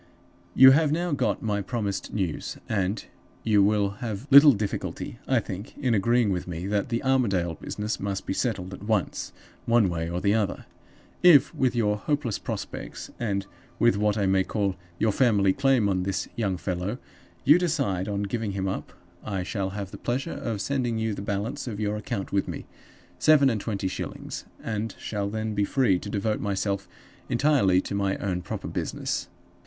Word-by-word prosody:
"You 130 0 +10
have 150 +2 +4
now 175 +2 0
got 140 -3 0
my 105 -2 0
promised 100 -2 -3
news, 95 -7 -3
and 100 -1 -1 0.4
you 105 -3 +4
will 100 0 +3
have 110 0 -4
little 140 +1 +10
difficulty, 105 +2 -4
I 130 -2 +3
think, 100 -1 -7
in 130 -5 +1
agreeing 115 +1 +3
with 90 -1 -2
me 85 0 -5
that 100 +2 -1
the 115 -1 -1
Armadale 100 -11 +2
business 105 +7 -4
must 100 -1 -3
be - - -1
settled 95 -5 -2
at - - -9
once, 105 -2 -1 0.4
one 115 -4 +4
way 85 -1 -2
or 85 +1 -2
the 100 +2 +2
other. 105 -4 -1 0.6
If, 155 -5 +7
with 130 -5 +1
your 105 -3 +2
hopeless 135 -1 -1
prospects, - - -6
and 100 -4 -1 0.3
with 120 -3 +4
what 105 +1 +1
I 100 - +1
may 95 0 +3
call 100 -1 -1 0.2
your 110 - +2
family 100 -5 +3
claim 135 -4 +3
on 95 -2 +1
this 95 +1 -2
young 100 -6 -1
fellow, 90 +5 -3 0.5
you 150 +6 +7
decide 140 - 0
on 100 -1 -1
giving 105 0 -2
him 95 0 -2
up, 95 - -4 0.3
I 95 -4 -3
shall 95 +1 -2
have 100 0 -6
the - - -9
pleasure 135 +7 -2
of 110 -4 -3
sending 125 -2 -1
you 110 -1 -1
the 100 - -5
balance 100 +6 -3
of 110 -3 -4
your 105 -1 -1
account 105 -2 -4
with 100 - +1
me - - -6 0.5
(seven 140 -4 +5
and 110 -3 -2
twenty 100 -4 -2
shillings), 95 - -5 0.2
and 110 0 -3
shall 100 -2 -3
then 110 +1 -3
be 105 0 +1
free 105 -5 +2
to 105 - -7
devote 105 +1 -1
myself 100 -1 -1 0.4
entirely 120 -8 +3
to - - -6
my 100 -1 0
own 90 -3 -2
proper - - -5
business. - - -3
105 Hz, 180 wpm, -26 LUFS, 100-120 Hz, 0.6 s, You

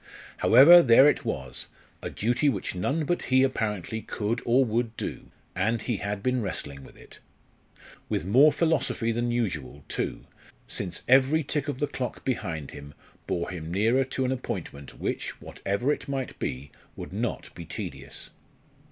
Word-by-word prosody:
However, 155 +9 +9
there 130 -1 +7
it 150 - +2
was, 65 - -4 0.3
a - - -4
duty 120 +7 +1
which 100 -8 -2
none 140 - -1
but 175 +4 -1
he 130 0 +4
apparently 110 -5 -1
could 110 +3 -2
or 130 +3 +4
would 115 0 -1
do, - - -5 0.3
and 110 +5 +1
he 120 -4 -2
had 100 0 -4
been 125 -1 +1
wrestling 70 -9 -5
with - - -15
it. - - -16 0.9
With - - -1
more 135 +10 +6
philosophy 145 -7 +1
than 120 +1 -1
usual, 85 - -2
too, - - -3 0.4
since 90 -4 -4
every 135 +5 +5
tick 145 +1 -2
of 145 - -2
the 145 - +1
clock 130 -3 -5
behind 85 - -3
him 70 0 -11 0.3
bore 85 0 -2
him 85 -2 -6
nearer 115 +8 +3
to 130 0 -2
an 130 - 0
appointment 70 - -6
which, - - -3
whatever 120 +9 -1
it - - -7
might 135 -2 -4
be, 65 +3 -4 0.2
would - - -8
not - - -3
be 85 - -8
tedious. - - -7
115 Hz, 160 wpm, -27 LUFS, 95-135 Hz, 0.9 s, However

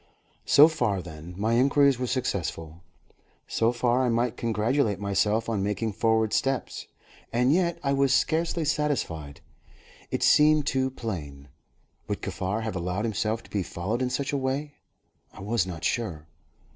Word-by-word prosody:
So 150 +2 +8
far, 125 -12 0
then, 85 0 -9
my 110 +3 0
inquiries 140 +1 +4
were 125 - -1
successful; 85 - -3 0.7
so 115 +1 +1
far 125 +1 +1
I 125 - +1
might 120 0 0
congratulate 115 -1 0
myself 105 +2 0
on 110 -4 -1
making 105 +2 -2
forward 110 0 +1
steps. 135 -2 -1 0.4
And 125 +4 +3
yet 175 -1 +1
I 140 -1 +1
was 135 -1 +2
scarcely 165 +3 +1
satisfied. 80 - -2 0.7
It - - -2
seemed 150 0 +5
too 130 -2 0
plain. 75 - -7 0.6
Would 105 - -4
Kaffar 95 +3 -2
have 110 -3 -4
allowed 90 +4 -2
himself 110 +1 -1
to - - -17
be 100 - 0
followed 95 +7 -3
in 125 - 0
such 135 +3 -2
a - - +1
way? 135 +3 -2 0.6
I - - -11
was 105 -2 0
not 85 -3 -7
sure. 90 -11 -2
115 Hz, 155 wpm, -26 LUFS, 95-135 Hz, 0.7 s, So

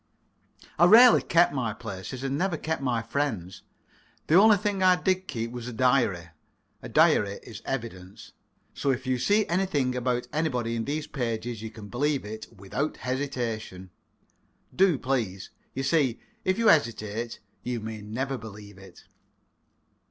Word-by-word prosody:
I 175 - +7
rarely 230 +6 +8
kept 170 -3 +3
my 120 -6 -1
places, 100 +8 -7
and 135 0 -1
never 175 +2 0
kept 160 -2 -3
my 120 -4 0
friends. 115 -8 -3 0.6
The - - 0
only 210 +4 +7
thing 205 -1 -2
I 185 -1 +6
did 185 0 0
keep 115 -3 -4
was 120 -1 -7
a 125 - -6
diary. 115 -9 +1 0.5
A - - -8
diary 100 -1 +3
is 115 -2 -10
evidence. 110 -5 -6 0.4
So 140 - -2
if 130 0 -1
you 130 -1 0
see 205 - +3
anything 170 -8 0
about 125 0 -1
anybody 125 -7 -1
in 115 -1 -2
these 150 +2 -2
pages, 115 -4 -4
you 110 - -5
can 110 -2 -11
believe 140 +3 -1
it 110 +1 -7
without 115 +8 -4
hesitation. 120 -8 -4 0.8
Do, 185 -5 +4
please. 115 -9 -2 0.2
You 135 - -2
see, 135 -4 +1 0.2
if 185 +1 +1
you 230 -1 +4
hesitate, 115 -5 0 0.2
you 125 -1 -3
may 110 0 -6
never 130 +5 -3
believe 105 -2 -11
it. 95 -2 -15
125 Hz, 150 wpm, -27 LUFS, 110-150 Hz, 0.8 s, rarely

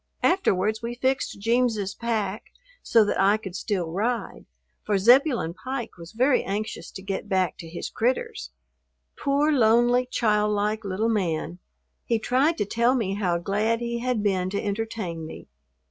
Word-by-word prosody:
Afterwards 215 - +2
we 235 +1 -4
fixed 260 -3 -1
"Jeems's" 225 -3 +1
pack 215 -3 -2 0.4
so 225 -2 +4
that - - -1
I 200 +2 +4
could 190 -4 -8
still 185 -5 -2
ride, 230 +7 -2 0.4
for 205 -2 +1
Zebulon 240 - +4
Pike 240 +5 -5
was 170 +2 -12
very 255 +4 +3
anxious 205 +2 -4
to 190 - -9
get 195 +1 -4
back 185 -3 +1
to 165 - -8
his 170 - -6
"critters." 350 - -1 0.7
Poor, 285 +2 +1
lonely, 240 -1 +4
childlike 210 -1 +1
little 200 +3 -1
man! 175 -5 -1 0.4
He 230 - +1
tried 270 +9 +1
to - - 0
tell 235 +5 +2
me 210 -6 -1
how 185 -4 0
glad 210 +6 0
he 235 0 -3
had 245 -3 -1
been 185 -3 +1
to 200 +1 -2
entertain 205 -5 -3
me. - - -10
215 Hz, 155 wpm, -25 LUFS, 195-240 Hz, 0.7 s, so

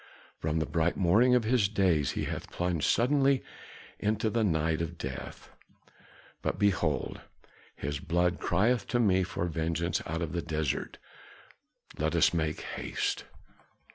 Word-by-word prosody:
From 80 +1 -1
the 80 - +1
bright 85 +1 0
morning 110 +8 +4
of 125 - +3
his 110 -3 +2
days 90 -9 +2
he - - -2
hath - - -4
been - - -15
plunged 90 -4 0
suddenly 135 +2 +3 0.6
into 110 +1 0
the 115 0 +1
night 80 -3 +1
of 85 +1 -4
death. 65 -3 -7 0.9
But - - -1
behold, 85 -9 0 0.5
his 70 +1 -4
blood 85 +2 +1
crieth 115 +1 +1
to 120 - 0
me 95 -5 +4
for 90 -1 -2
vengeance 85 +1 -1
out 80 +2 -2
of 80 - -4
the 85 - -2
desert. 80 -3 -2 1.0
Let - - 0
us - - +4
make 80 -2 -1
haste!" - - -3
85 Hz, 145 wpm, -30 LUFS, 80-105 Hz, 1.0 s, morning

